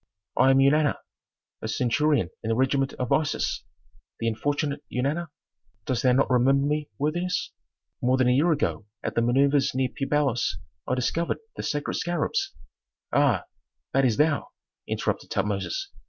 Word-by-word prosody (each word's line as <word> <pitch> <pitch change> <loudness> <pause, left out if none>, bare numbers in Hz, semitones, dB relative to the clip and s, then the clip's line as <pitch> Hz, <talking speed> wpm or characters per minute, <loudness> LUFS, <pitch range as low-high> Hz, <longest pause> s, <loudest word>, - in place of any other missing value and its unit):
"I 130 - +5
am 135 - +5
Eunana, 145 +2 +4 0.7
a - - -3
centurion 125 - +1
in 110 - -4
the 115 - +2
regiment 135 +2 +1
of 125 -2 -4
Isis. 155 -1 0 0.6
The 115 - -1
unfortunate 145 +5 -1
Eunana. 145 +7 -1 0.6
Dost 125 -3 0
thou 130 - +4
not 135 +2 +3
remember 135 +2 +3
me, 150 +1 -1
worthiness? 175 +5 -1 0.5
More 125 +1 +3
than 130 -1 +3
a - - +5
year 155 +7 +3
ago 140 -8 -1 0.2
at - - -2
the 115 - +2
manœuvres 135 +3 +3
near 130 -1 +1
Pi 135 - -4
Bailos 135 -4 +1 0.3
I 130 - +1
discovered 165 +7 0 0.2
the - - -4
sacred 145 -1 -2
scarabs 390 - -1 0.3
" - - -35
"Ah, - - +3 0.5
that 135 - +3
is 120 -5 +2
thou!" 150 -1 +2 0.4
interrupted - - -2
Tutmosis. 105 - -2
135 Hz, 155 wpm, -26 LUFS, 125-150 Hz, 0.7 s, I